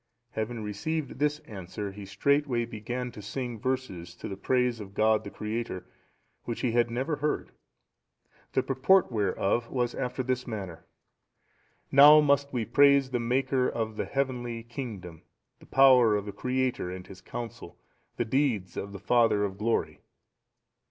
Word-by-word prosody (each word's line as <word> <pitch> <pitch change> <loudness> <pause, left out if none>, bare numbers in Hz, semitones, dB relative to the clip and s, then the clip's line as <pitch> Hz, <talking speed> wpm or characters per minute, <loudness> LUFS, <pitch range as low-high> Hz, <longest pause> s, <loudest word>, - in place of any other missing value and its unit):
Having 110 +1 -3
received 135 +8 -3
this 150 0 +1
answer 100 +1 -7
he 100 0 -9
straightway 140 +1 +1
began 120 +2 -5
to 105 - -10
sing 120 +2 -5
verses 100 -10 -3
to - - -7
the 95 - -5
praise 125 +3 +1
of 100 -2 -10
God 110 0 +3
the - - -7
Creator, 105 -4 -4 0.6
which 115 - -4
he 125 - +1
had 120 0 +2
never 130 +6 -2
heard, 150 +1 -2 1.0
the - - +2
purport 135 +7 +3
whereof 105 +2 0
was 125 -2 -1
after 130 0 -3
this 130 0 -2
manner: 95 -7 -6 1.0
"Now 145 +2 +9
must 140 -1 +2
we 120 -4 -1
praise 140 -1 +4
the 125 - 0
Maker 130 +2 +1
of 110 -1 -3
the - - -2
heavenly 120 -4 -2
kingdom, 110 - -7 0.4
the - - -17
power 125 -5 +6
of 105 -1 -2
the 105 - -5
Creator 125 -1 -1
and 90 0 -7
His 95 -1 -12
counsel, 115 -3 -8 0.4
the 120 - 0
deeds 115 -7 0
of 100 0 -5
the 100 - -7
Father 115 0 +3
of 100 -1 -3
glory. 115 +2 -1
120 Hz, 155 wpm, -28 LUFS, 105-130 Hz, 1.0 s, Now